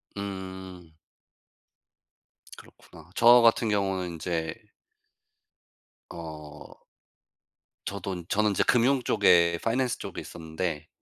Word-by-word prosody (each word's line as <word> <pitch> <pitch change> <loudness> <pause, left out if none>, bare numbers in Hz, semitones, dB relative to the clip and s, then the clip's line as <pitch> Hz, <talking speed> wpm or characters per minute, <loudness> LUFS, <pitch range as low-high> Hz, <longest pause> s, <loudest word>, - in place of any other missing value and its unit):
음. 95 -4 -8 1.6
그렇구나. - - -17
저 120 +1 +7
같은 115 -1 +3
경우는 95 -3 -1
인제 80 -1 -3 1.6
어. 75 -3 -10 1.1
저도 95 -3 -5
저는 105 0 +1
인제 - - +1
금융 125 +2 +3
쪽에 85 -7 +4
파이낸스 125 +2 0
쪽에 - - -6
있었는데 80 -1 -5
95 Hz, 185 characters per minute, -27 LUFS, 85-105 Hz, 1.6 s, 저